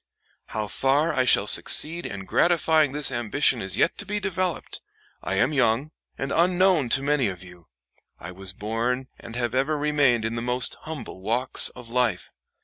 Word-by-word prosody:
How 110 Hz, -1 st, -4 dB
far 140 Hz, -, 0 dB
I 130 Hz, -3 st, 0 dB
shall -, -, +4 dB
succeed 170 Hz, +3 st, +5 dB
in 95 Hz, -1 st, -8 dB
gratifying 160 Hz, -, +1 dB
this 145 Hz, -1 st, +4 dB
ambition 120 Hz, +1 st, 0 dB
is 95 Hz, 0 st, -3 dB
yet -, -, 0 dB
to -, -, -1 dB
be 210 Hz, +1 st, -3 dB
developed. 185 Hz, -3 st, -4 dB, 0.4 s
I -, -, -3 dB
am 145 Hz, -, +1 dB
young, 130 Hz, +2 st, 0 dB, 0.3 s
and 135 Hz, +1 st, -4 dB
unknown 180 Hz, -4 st, +2 dB
to 135 Hz, -, -8 dB
many 145 Hz, -4 st, +1 dB
of 95 Hz, -2 st, -7 dB
you. 90 Hz, -2 st, -16 dB, 0.5 s
I 85 Hz, -, -9 dB
was 95 Hz, +1 st, -7 dB
born 115 Hz, +6 st, -3 dB
and 115 Hz, -, -11 dB
have 120 Hz, -1 st, -3 dB
ever 140 Hz, +4 st, 0 dB
remained 145 Hz, -6 st, +1 dB
in 115 Hz, -, -3 dB
the 115 Hz, -, -4 dB
most 125 Hz, +1 st, +1 dB
humble 145 Hz, -11 st, -8 dB
walks 120 Hz, +6 st, +2 dB
of 125 Hz, -2 st, -12 dB
life. 120 Hz, -7 st, -2 dB
130 Hz, 175 wpm, -24 LUFS, 115-150 Hz, 0.5 s, succeed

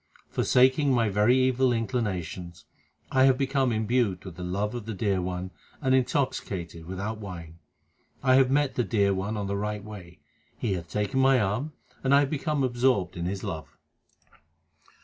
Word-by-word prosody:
Forsaking 130 Hz, +3 st, +3 dB
my 115 Hz, -4 st, +2 dB
very 105 Hz, +6 st, +3 dB
evil 130 Hz, 0 st, +3 dB
inclinations, 95 Hz, -, -3 dB, 0.5 s
I 130 Hz, 0 st, +5 dB
have 130 Hz, -1 st, +4 dB
become 135 Hz, -1 st, +1 dB
imbued 110 Hz, -3 st, 0 dB
with 90 Hz, -3 st, -8 dB
the 90 Hz, -, -9 dB
love 100 Hz, +5 st, -2 dB
of 120 Hz, -3 st, -6 dB
the 110 Hz, -, -4 dB
Dear 95 Hz, -2 st, 0 dB
One 90 Hz, +1 st, -4 dB, 0.3 s
and 130 Hz, -2 st, +1 dB
intoxicated 95 Hz, -, -1 dB
without 100 Hz, +4 st, -4 dB
wine. 85 Hz, -5 st, -9 dB, 0.6 s
I 130 Hz, -1 st, +4 dB
have 130 Hz, -1 st, +5 dB
met 145 Hz, 0 st, +2 dB
the 125 Hz, -, 0 dB
Dear 100 Hz, -4 st, +2 dB
One 100 Hz, +3 st, -3 dB
on 100 Hz, -, -2 dB
the 100 Hz, 0 st, -2 dB
right 105 Hz, 0 st, -3 dB
way; 95 Hz, -7 st, -11 dB, 0.4 s
He 110 Hz, -5 st, -1 dB
hath 85 Hz, -3 st, -5 dB
taken 105 Hz, -, -1 dB
my 135 Hz, -1 st, +5 dB
arm, 110 Hz, +9 st, -1 dB, 0.3 s
and 135 Hz, +1 st, +4 dB
I 140 Hz, -, +6 dB
have 140 Hz, -, -1 dB
become 150 Hz, -1 st, -1 dB
absorbed 125 Hz, -5 st, +1 dB
in 85 Hz, 0 st, -3 dB
His 95 Hz, +1 st, -4 dB
love. 80 Hz, -2 st, -6 dB
110 Hz, 170 wpm, -27 LUFS, 95-130 Hz, 0.6 s, I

